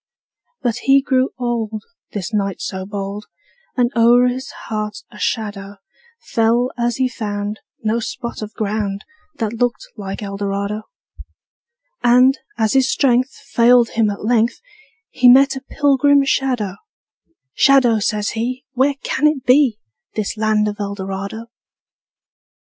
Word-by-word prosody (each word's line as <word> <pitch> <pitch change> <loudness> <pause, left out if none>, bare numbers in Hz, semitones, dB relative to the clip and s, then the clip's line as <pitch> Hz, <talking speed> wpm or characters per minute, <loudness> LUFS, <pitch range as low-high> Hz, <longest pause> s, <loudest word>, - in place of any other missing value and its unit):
But 240 -2 0
he 270 +2 +4
grew 265 -1 +1
old, 225 -4 -2 0.3
This 205 +2 -5
knight 200 -3 -1
so 190 -1 -5
bold, 200 +1 -5 0.5
And 245 -1 +2
o'er 240 +2 +5
his 260 +2 -5 0.2
heart 210 -1 -4
a 210 - -13
shadow 205 -2 -3 0.5
Fell 235 - +1
as 240 -1 0
he 260 0 +1
found 210 -3 -4 0.2
No 220 +2 +1
spot 235 +1 -5
of 215 0 -7
ground 205 -1 -2 0.3
That 225 -5 -2
looked 245 +1 -1
like 195 -1 -6
Eldorado. 200 +1 -3 1.1
And, 250 +2 +5 0.2
as 220 -1 +1
his 265 -1 +3
strength 255 -1 +2 0.2
Failed 240 -1 +5
him 220 -2 +1
at 205 0 -5
length, 235 0 +2 0.5
He 250 -1 +5
met 270 +2 +6
a 265 - -6
pilgrim 285 0 +3
shadow: 245 -8 0 0.8
``Shadow,'' 250 -5 +4
says 210 0 0
he, 245 +4 -3
``Where 275 +2 +2
can 300 - +2
it 300 -4 -1
be, 255 -3 +4 0.4
This 215 0 -2
land 215 -1 +1
of 205 0 -4
Eldorado?'' 200 +2 -5
230 Hz, 135 wpm, -19 LUFS, 210-255 Hz, 1.1 s, met